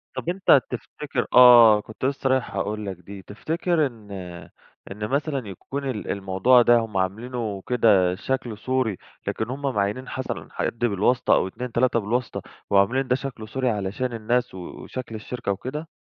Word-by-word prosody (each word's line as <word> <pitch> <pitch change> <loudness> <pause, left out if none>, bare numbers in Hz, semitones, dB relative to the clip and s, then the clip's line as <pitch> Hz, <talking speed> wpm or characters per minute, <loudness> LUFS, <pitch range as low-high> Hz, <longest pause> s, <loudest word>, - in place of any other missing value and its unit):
طب 170 - -4
أنت 180 -7 +4
تفتكر 130 +1 -4
آه، 120 -4 +8
كنت 110 +5 -7
لسه 135 -1 0
رايح 130 -1 0
أقول 105 0 -2
لك 95 -3 -5
دي، 95 +2 -11
تفتكر 160 - -1
إن 110 -5 -14 0.8
إن 105 +1 -4
مثلًا 140 -3 -1
يكون 135 +9 -5
ال 110 -5 -4
الموضوع 100 +6 +3
ده 120 0 +5
هُم 110 -4 -4
عاملينه 105 +1 -3
كده 100 -7 +3
شكل 120 +1 -3
صوري، 130 -3 -1 0.3
لكن 110 +2 -2
هُم 135 +2 -5
معيّنين 125 -1 -1
مثلًا 130 - -5
حد 115 - -3
بالواسطة 120 +2 +2
أو - - +2
2 125 +5 -6
3 120 0 +2
بالواسطة، 115 +4 -2 0.3
وعاملين 100 +7 +3
ده 125 - +2
شكل 125 -5 -6
صوري 130 +2 -1
علشان 105 +4 -2
الناس 120 +2 -1
و - - -7 0.3
وشكل 125 -3 -7
الشركة 115 0 -4
وكده؟ 140 +10 -5
120 Hz, 160 wpm, -24 LUFS, 105-130 Hz, 0.8 s, آه